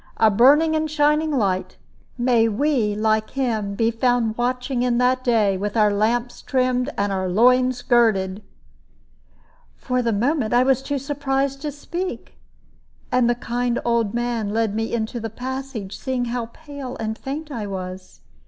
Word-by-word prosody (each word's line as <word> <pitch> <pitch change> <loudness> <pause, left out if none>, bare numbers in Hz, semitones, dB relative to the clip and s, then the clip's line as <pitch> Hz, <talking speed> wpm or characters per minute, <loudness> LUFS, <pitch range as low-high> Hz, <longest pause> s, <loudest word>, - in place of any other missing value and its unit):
A 220 -1 +5
burning 290 +9 +5
and 310 0 +1
a 310 - -6
shining 300 +1 +2
light! 200 -10 -1 0.4
May 240 -2 +3
we 230 -3 +1
like 215 0 +1
him 220 -7 -2
be 225 +2 +1
found 230 -1 +1
watching 250 +1 -1
in 245 -1 +1
that 255 +1 +2
day, 215 -6 +2
with 205 +3 -3
our 210 -1 +4
lamps 230 +4 0
trimmed 255 0 0
and 200 0 0
our 190 -1 -1
loins 250 +5 +3
girded!" 210 -5 +2 1.4
For 250 -1 -1
the 235 -1 0
moment 240 +2 0
I 245 - +5
was 265 0 +2
too 285 +1 -2
surprised 275 0 -2
to 300 -1 -3
speak, 345 +6 -6 0.7
and 250 -1 +3
the 240 - +2
kind 240 0 -2
old 235 -3 +1
man 240 -3 -1
led 220 0 0
me 225 +1 -2
into 235 +1 -2
the 225 0 -4
passage, 255 -3 -6
seeing 255 -2 -2
how 240 -1 -3
pale 285 -1 -9
and 220 0 -2
faint 295 +5 -6
I 225 -6 -4
was. 185 -1 -7
240 Hz, 160 wpm, -22 LUFS, 220-265 Hz, 1.4 s, A